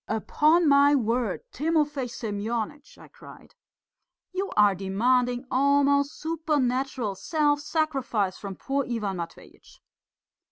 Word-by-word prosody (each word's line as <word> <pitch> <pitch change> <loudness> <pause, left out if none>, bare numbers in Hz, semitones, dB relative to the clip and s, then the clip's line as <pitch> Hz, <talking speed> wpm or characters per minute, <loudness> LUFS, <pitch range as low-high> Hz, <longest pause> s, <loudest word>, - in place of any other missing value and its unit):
"Upon 305 +9 +2
my 285 0 +5
word, 235 -4 -1
Timofey 295 -3 0
Semyonitch!" 230 +5 -5
I - - -14
cried, - - -15 0.8
"you 390 +2 -2
are 205 -1 +6
demanding 245 +7 0
almost 280 +1 +2
supernatural 270 -8 -1
self 290 - 0
sacrifice 270 - -1
from 195 -2 -7
poor 275 +6 -2
Ivan 210 -5 -2
Matveitch." 170 -1 -10
260 Hz, 105 wpm, -26 LUFS, 220-290 Hz, 0.8 s, are